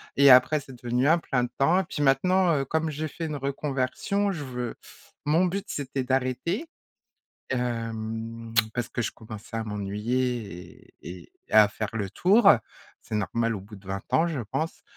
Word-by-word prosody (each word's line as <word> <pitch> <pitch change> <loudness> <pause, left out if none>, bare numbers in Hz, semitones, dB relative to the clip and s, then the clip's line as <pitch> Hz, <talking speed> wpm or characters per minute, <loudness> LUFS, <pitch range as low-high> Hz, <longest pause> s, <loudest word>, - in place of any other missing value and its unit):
et 140 0 +7
après, 130 +4 +6
c'est 135 - -12
devenu 125 +2 +1
un 165 +3 +5
plein 125 -6 0
temps. 135 +9 +2
Et - - -4
puis 150 - -5
maintenant, 170 +6 +3
heu, 135 - -1
comme 160 +3 0
j'ai 155 +1 -3
fait 165 - -5
une 155 -2 -3
reconversion, 140 +8 -1
je 160 -6 -4
veux 125 -3 -4 0.5
mon 160 +5 +3
but, 195 +3 -2
c'était 135 -4 -3
d'arrêter, 130 - -1 0.8
hem, 115 -2 -3 0.2
parce 120 0 -2
que 120 - -3
je - - -2
commençais 110 +1 -9
à 115 - -1
m'ennuyer 105 -1 -3
et - - -9 0.3
et-et - - -21
à 105 -1 +8
faire 105 0 -4
le 105 -4 -2
tour. 200 +3 +5 0.5
C'est 110 - -3
normal 115 +3 0
au 95 - -7
bout 105 +2 -12
de 100 0 -17
20 95 - -2
ans 165 - +3
je 155 -5 -3
pense, 135 +9 -4
130 Hz, 175 wpm, -26 LUFS, 115-155 Hz, 0.8 s, à